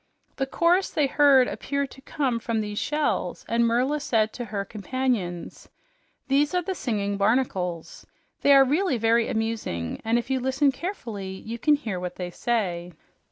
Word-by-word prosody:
The 270 Hz, -, -1 dB
chorus 350 Hz, +6 st, +2 dB
they 300 Hz, -, +1 dB
heard 275 Hz, -2 st, +5 dB
appeared 280 Hz, -1 st, -3 dB
to 270 Hz, -, -13 dB
come 265 Hz, -4 st, -1 dB
from 230 Hz, -1 st, -2 dB
these 210 Hz, -1 st, -3 dB
shells, 300 Hz, 0 st, -1 dB
and 235 Hz, 0 st, +2 dB
Merla 255 Hz, +6 st, +1 dB
said 225 Hz, -6 st, +1 dB
to 245 Hz, -, -5 dB
her 200 Hz, -2 st, -3 dB
companions, 215 Hz, -6 st, -3 dB, 0.6 s
"These 285 Hz, +4 st, +2 dB
are 360 Hz, -, +1 dB
the 380 Hz, -, -2 dB
singing 205 Hz, -, -2 dB
barnacles. 195 Hz, -6 st, -1 dB, 0.3 s
They 285 Hz, -, +6 dB
are 270 Hz, 0 st, +7 dB
really 295 Hz, +1 st, +1 dB
very 230 Hz, +1 st, +3 dB
amusing, 220 Hz, -, -3 dB
and 225 Hz, +2 st, +2 dB
if 240 Hz, +2 st, -3 dB
you 265 Hz, -, +1 dB
listen 265 Hz, +2 st, +2 dB
carefully, 235 Hz, -, -5 dB, 0.2 s
you 230 Hz, +2 st, -5 dB
can 300 Hz, +3 st, +4 dB
hear 220 Hz, -10 st, -4 dB
what 180 Hz, 0 st, -5 dB
they 180 Hz, -1 st, -5 dB
say." 180 Hz, -6 st, -2 dB
235 Hz, 165 wpm, -25 LUFS, 210-280 Hz, 0.6 s, are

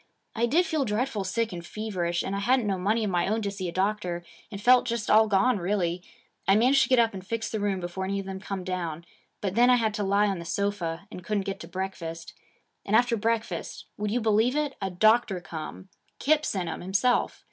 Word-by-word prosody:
I 235 Hz, +1 st, +2 dB
did 335 Hz, +9 st, +3 dB
feel 315 Hz, -4 st, 0 dB
dreadful 220 Hz, -1 st, -1 dB
sick 220 Hz, +3 st, -1 dB
and 170 Hz, -1 st, -6 dB
feverish, 175 Hz, -4 st, -2 dB
and 195 Hz, -, -3 dB
I -, -, -1 dB
hadn't 245 Hz, +3 st, +2 dB
no 195 Hz, -2 st, -1 dB
money 215 Hz, +5 st, +1 dB
of 205 Hz, -, -1 dB
my 175 Hz, -1 st, +1 dB
own 220 Hz, +2 st, 0 dB
to 200 Hz, -, -1 dB
see 195 Hz, -2 st, -4 dB
a -, -, -5 dB
doctor, 185 Hz, -2 st, -1 dB, 0.3 s
and 200 Hz, -, -6 dB
felt 250 Hz, +4 st, +5 dB
just 235 Hz, -2 st, -1 dB
all 220 Hz, +1 st, +6 dB
gone 210 Hz, +3 st, +3 dB
really. 180 Hz, -1 st, -1 dB, 0.5 s
I 195 Hz, -, +6 dB
managed 255 Hz, +5 st, +5 dB
to 235 Hz, -, +2 dB
get 255 Hz, -, +5 dB
up 230 Hz, -2 st, +3 dB
and 190 Hz, -1 st, -7 dB
fix 225 Hz, +3 st, -3 dB
the 220 Hz, -, -2 dB
room 200 Hz, -2 st, 0 dB
before 175 Hz, +2 st, -4 dB
any 200 Hz, +1 st, -1 dB
of 195 Hz, -, -5 dB
them 190 Hz, 0 st, -5 dB
come 195 Hz, -1 st, -5 dB
down. 170 Hz, -3 st, -4 dB, 0.4 s
But 195 Hz, -3 st, -2 dB
then 240 Hz, +3 st, +5 dB
I 250 Hz, -, +7 dB
had 225 Hz, -3 st, +1 dB
to 210 Hz, -1 st, -2 dB
lie 200 Hz, +1 st, +3 dB
on 195 Hz, -3 st, -1 dB
the -, -, -6 dB
sofa, 175 Hz, -1 st, -2 dB
and 180 Hz, -, -8 dB
couldn't 200 Hz, +1 st, -1 dB
get 195 Hz, -1 st, -4 dB
to 165 Hz, -, -9 dB
breakfast. 170 Hz, -2 st, -5 dB, 0.5 s
And 205 Hz, -, 0 dB
after 240 Hz, +1 st, +4 dB
breakfast 230 Hz, +1 st, -2 dB
would 210 Hz, 0 st, -2 dB
you 240 Hz, +4 st, 0 dB
believe 220 Hz, +4 st, +2 dB
it? 295 Hz, -2 st, 0 dB
a 195 Hz, -, -1 dB
doctor 215 Hz, +1 st, +3 dB
come. 170 Hz, +2 st, -8 dB, 0.3 s
Kip 305 Hz, +1 st, +2 dB
sent 185 Hz, -4 st, -2 dB
him, 165 Hz, -, -4 dB
himself. 200 Hz, +7 st, +1 dB
200 Hz, 235 wpm, -27 LUFS, 185-230 Hz, 0.5 s, I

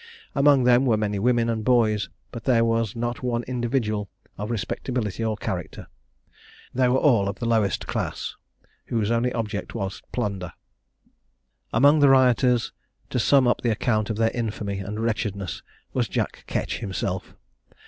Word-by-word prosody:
Among 140 Hz, -2 st, +5 dB
them 125 Hz, +2 st, +4 dB
were 110 Hz, -3 st, +3 dB
many 105 Hz, -1 st, -1 dB
women 120 Hz, +1 st, +2 dB
and 115 Hz, -1 st, -1 dB
boys 110 Hz, -5 st, +2 dB, 0.2 s
but 120 Hz, -2 st, -8 dB
there 115 Hz, -3 st, +4 dB
was 115 Hz, -2 st, 0 dB
not 120 Hz, +1 st, -3 dB
one 120 Hz, -1 st, -1 dB
individual 120 Hz, -5 st, -1 dB, 0.3 s
of 105 Hz, +2 st, -5 dB
respectability 115 Hz, 0 st, -2 dB
or 110 Hz, -1 st, -1 dB
character. 90 Hz, -4 st, -5 dB, 0.9 s
They 130 Hz, 0 st, +3 dB
were 130 Hz, -, +3 dB
all 115 Hz, -9 st, +3 dB
of 100 Hz, -, -5 dB
the 120 Hz, -, -4 dB
lowest 110 Hz, -5 st, +1 dB
class, -, -, -3 dB, 0.5 s
whose 110 Hz, -2 st, 0 dB
only 120 Hz, +2 st, +1 dB
object 105 Hz, -2 st, -4 dB
was 95 Hz, -3 st, -4 dB
plunder. 100 Hz, -7 st, -3 dB, 1.2 s
Among 145 Hz, +6 st, +5 dB
the 145 Hz, -1 st, +6 dB
rioters, 125 Hz, -2 st, +4 dB, 0.4 s
to 125 Hz, -, 0 dB
sum 135 Hz, +2 st, +4 dB
up 120 Hz, -, +2 dB
the 120 Hz, -, +1 dB
account 110 Hz, -1 st, 0 dB
of 110 Hz, -, -2 dB
their 115 Hz, 0 st, +2 dB
infamy 105 Hz, -4 st, -3 dB
and 100 Hz, +3 st, -5 dB
wretchedness, 105 Hz, -4 st, -2 dB, 0.3 s
was -, -, +1 dB
Jack -, -, -3 dB
Ketch -, -, -2 dB
himself. 95 Hz, -1 st, -4 dB
115 Hz, 155 wpm, -24 LUFS, 105-125 Hz, 1.2 s, the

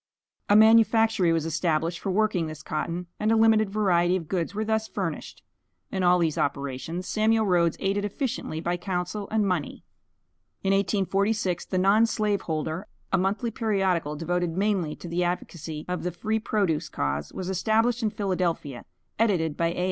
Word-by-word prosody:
A 205 Hz, -, +6 dB
manufactory 220 Hz, -3 st, +5 dB
was 165 Hz, -1 st, 0 dB
established 165 Hz, +1 st, 0 dB
for -, -, -4 dB
working 190 Hz, -4 st, +1 dB
this 155 Hz, -1 st, -8 dB
cotton, 170 Hz, +4 st, -3 dB
and 215 Hz, +1 st, +1 dB
a -, -, +4 dB
limited 220 Hz, -2 st, +4 dB
variety 185 Hz, -4 st, +2 dB
of 170 Hz, -4 st, -4 dB
goods 180 Hz, +2 st, -2 dB
were 215 Hz, +1 st, -1 dB
thus 220 Hz, 0 st, 0 dB
furnished. 175 Hz, -8 st, -5 dB, 0.5 s
In 190 Hz, -, -2 dB
all 180 Hz, 0 st, +5 dB
these 165 Hz, -3 st, 0 dB
operations 140 Hz, +6 st, -3 dB
Samuel 220 Hz, 0 st, +2 dB
Rhoads 175 Hz, -3 st, +2 dB
aided 200 Hz, +1 st, 0 dB
efficiently 205 Hz, -, -3 dB
by 175 Hz, +2 st, -1 dB
counsel 185 Hz, +2 st, -3 dB
and 215 Hz, -2 st, +1 dB
money. 180 Hz, -6 st, -2 dB, 0.8 s
In 195 Hz, 0 st, +2 dB
1846, 195 Hz, -1 st, 0 dB
"The 185 Hz, -, -2 dB
Non 200 Hz, +5 st, +4 dB
slave 210 Hz, -3 st, 0 dB
holder," 160 Hz, +3 st, -3 dB, 0.3 s
a 190 Hz, -, +4 dB
monthly 205 Hz, +5 st, 0 dB
periodical, 190 Hz, -9 st, 0 dB
devoted 175 Hz, +2 st, -2 dB
mainly 190 Hz, -6 st, 0 dB
to -, -, -10 dB
the 170 Hz, +1 st, -1 dB
advocacy 165 Hz, -3 st, -4 dB
of 180 Hz, 0 st, -3 dB
the 180 Hz, -, -2 dB
Free 215 Hz, +6 st, -1 dB
Produce 175 Hz, -8 st, 0 dB
cause, 70 Hz, -, -2 dB
was 185 Hz, -, -5 dB
established 220 Hz, +6 st, +1 dB
in 220 Hz, -, +1 dB
Philadelphia, 180 Hz, -, -2 dB, 0.3 s
edited 175 Hz, -9 st, +1 dB
by 170 Hz, -, +1 dB
A. 170 Hz, -, -3 dB
185 Hz, 165 wpm, -26 LUFS, 165-215 Hz, 0.8 s, A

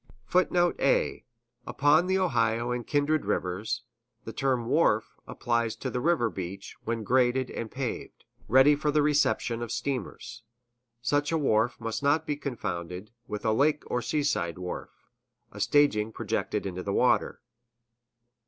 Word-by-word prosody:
[Footnote 175 Hz, +3 st, +2 dB
A: 135 Hz, -, +1 dB, 0.4 s
Upon 150 Hz, +5 st, +3 dB
the 190 Hz, 0 st, +2 dB
Ohio 120 Hz, -, +1 dB
and 125 Hz, -1 st, -3 dB
kindred 150 Hz, +1 st, +1 dB
rivers, 105 Hz, +6 st, -2 dB, 0.4 s
the -, -, -7 dB
term 130 Hz, -3 st, 0 dB
"wharf" 115 Hz, -5 st, +2 dB
applies 115 Hz, -2 st, -1 dB
to 130 Hz, -, -5 dB
the 125 Hz, -, -2 dB
river 165 Hz, -6 st, +2 dB
beach 95 Hz, +1 st, -7 dB
when 115 Hz, -1 st, -2 dB
graded 125 Hz, +2 st, +2 dB
and 115 Hz, -, -5 dB
paved, 130 Hz, 0 st, -5 dB, 0.2 s
ready 135 Hz, +4 st, +6 dB
for 150 Hz, +1 st, -1 dB
the 150 Hz, 0 st, +3 dB
reception 145 Hz, -5 st, +1 dB
of 120 Hz, -2 st, -4 dB
steamers. 125 Hz, -3 st, -4 dB, 0.6 s
Such 145 Hz, +4 st, +1 dB
a 165 Hz, -, +2 dB
wharf 120 Hz, -5 st, +1 dB
must 115 Hz, -1 st, -3 dB
not 145 Hz, +3 st, +2 dB
be 150 Hz, -2 st, -1 dB
confounded 95 Hz, -, -5 dB, 0.2 s
with 105 Hz, +1 st, -5 dB
a 110 Hz, -, +3 dB
lake 145 Hz, +6 st, +2 dB
or 125 Hz, -, 0 dB
seaside 120 Hz, -, -1 dB
wharf, 90 Hz, 0 st, -5 dB, 0.6 s
a -, -, -10 dB
staging 115 Hz, -7 st, +3 dB
projected -, -, -2 dB
into 90 Hz, -1 st, -4 dB
the 100 Hz, +1 st, -3 dB
water. 125 Hz, -, +2 dB
125 Hz, 145 wpm, -28 LUFS, 110-145 Hz, 0.6 s, ready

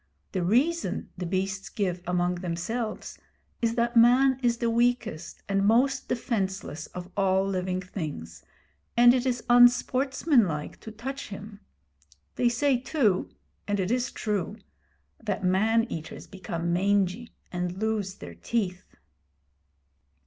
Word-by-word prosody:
The 185 Hz, -, -1 dB
reason 265 Hz, -, +1 dB
the 180 Hz, -1 st, -4 dB
beasts 190 Hz, +2 st, -2 dB
give 180 Hz, -4 st, -2 dB
among 180 Hz, 0 st, 0 dB
themselves 215 Hz, +6 st, -4 dB, 0.4 s
is 230 Hz, -1 st, +1 dB
that 235 Hz, 0 st, 0 dB
Man 250 Hz, +3 st, +5 dB
is 240 Hz, -2 st, +2 dB
the 235 Hz, -, -1 dB
weakest 235 Hz, -8 st, -1 dB
and 195 Hz, 0 st, +1 dB
most 255 Hz, +6 st, +3 dB
defenceless 190 Hz, -, -2 dB
of 180 Hz, +1 st, -9 dB
all 190 Hz, -1 st, +2 dB
living 185 Hz, -1 st, -1 dB
things, 145 Hz, -, -6 dB, 0.6 s
and 240 Hz, 0 st, +8 dB
it 255 Hz, 0 st, 0 dB
is 245 Hz, -2 st, -1 dB
unsportsmanlike 245 Hz, -, +3 dB
to 220 Hz, -, -9 dB
touch 265 Hz, +6 st, -6 dB
him. 205 Hz, 0 st, -9 dB, 0.8 s
They 240 Hz, -, +3 dB
say 265 Hz, +3 st, +2 dB
too 245 Hz, -, +1 dB, 0.4 s
and 205 Hz, -1 st, 0 dB
it 190 Hz, +2 st, 0 dB
is 245 Hz, 0 st, 0 dB
true 210 Hz, -1 st, -2 dB, 0.7 s
that 200 Hz, -4 st, -2 dB
man 215 Hz, +5 st, +3 dB
eaters 165 Hz, -9 st, -7 dB
become 170 Hz, -3 st, -4 dB
mangy, 200 Hz, +4 st, 0 dB, 0.2 s
and 180 Hz, 0 st, -3 dB
lose 210 Hz, -2 st, -1 dB
their 85 Hz, -1 st, -10 dB
teeth. 185 Hz, -, -3 dB
205 Hz, 125 wpm, -27 LUFS, 185-240 Hz, 0.8 s, and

